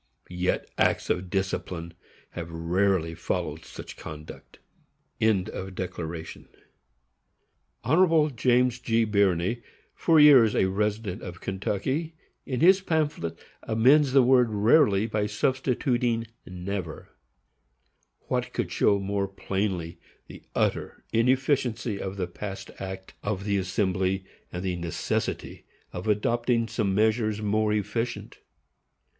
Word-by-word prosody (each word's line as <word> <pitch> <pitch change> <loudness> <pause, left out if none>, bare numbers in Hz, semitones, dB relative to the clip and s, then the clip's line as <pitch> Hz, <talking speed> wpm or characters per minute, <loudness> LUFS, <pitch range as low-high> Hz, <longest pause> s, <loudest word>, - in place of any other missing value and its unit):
_ 90 - -9
Yet 90 +1 0
acts - - +2
of 90 0 -2
discipline 90 -3 -3 0.4
have 85 -1 -6
rarely 85 +1 0
followed 80 -2 -3
such - - -10
conduct. 75 0 -10 0.6
Hon. 110 -4 +3 2.9
James 125 0 +2
G. 115 -2 +1
Birney, 100 +1 +1 0.3
for 165 -2 +3
years 135 -8 +7
a - - +3
resident 105 0 -1
of 90 -2 -8
Kentucky, 130 - -2 0.3
in 130 -1 -2
his 190 +3 +6
pamphlet, 150 - -1 0.2
amends 130 +5 +4
the 135 -2 +6
word 125 -1 +5
rarely 105 0 +4
by 105 -2 -1
substituting 120 0 0 0.2
never. 90 -2 -5 1.1
What - - -3
could - - -2
show 100 - +3
more 100 0 -1
plainly 95 -3 -3 0.3
the - - -12
utter - - -1
inefficiency 125 -3 +1
of 95 +1 -5
the 95 - -1
past 95 +2 -7
act 95 0 -7
of 100 -2 -3
the 100 -1 0
Assembly, 95 0 0 0.3
and 90 +1 -5
the 90 -1 -1
necessity 85 -1 -3 0.3
of 90 +4 -5
adopting 115 +2 +1
some 105 -3 -1
measures 110 0 +2
more 105 +1 +1
efficient? 105 +3 -3
105 Hz, 110 wpm, -26 LUFS, 95-120 Hz, 2.9 s, years